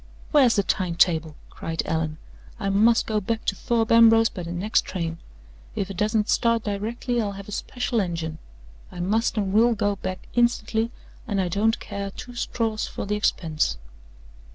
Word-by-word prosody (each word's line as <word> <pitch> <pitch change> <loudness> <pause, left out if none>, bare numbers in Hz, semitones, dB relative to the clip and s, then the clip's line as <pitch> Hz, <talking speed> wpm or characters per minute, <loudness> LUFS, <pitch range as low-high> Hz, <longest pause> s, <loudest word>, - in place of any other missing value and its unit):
"Where's 270 -6 +5
the 200 - +2
time 180 -3 -1
table?" 160 -3 +2 0.2
cried 165 0 -3
Allan. 160 -1 -1 0.4
"I 195 -3 -1
must 220 +4 +4
go 215 -1 0
back 225 +3 -3
to 200 - 0
Thorpe 225 +2 0
Ambrose 225 0 +7
by 185 - -7
the 170 0 -6
next 185 +5 +1
train! 165 -3 -4 0.6
If 195 0 -2
it 190 - -8
doesn't 210 0 +1
start 230 -1 +2
directly, 230 +4 -2
I'll 205 -2 -2
have 195 0 -9
a - - -8
special 245 +1 -1
engine. 165 -4 -3 0.5
I 180 - -9
must 220 +6 0
and 195 -2 0
will 230 +2 +4
go 205 -1 0
back 185 -1 -5
instantly, 230 -1 +1 0.4
and 205 -3 -1
I 185 -2 0
don't 215 +5 +1
care 200 0 -5
two 245 +5 -9
straws 225 -2 -2
for - - -5
the 205 - -2
expense!" 160 - 0
205 Hz, 175 wpm, -24 LUFS, 180-225 Hz, 0.6 s, Ambrose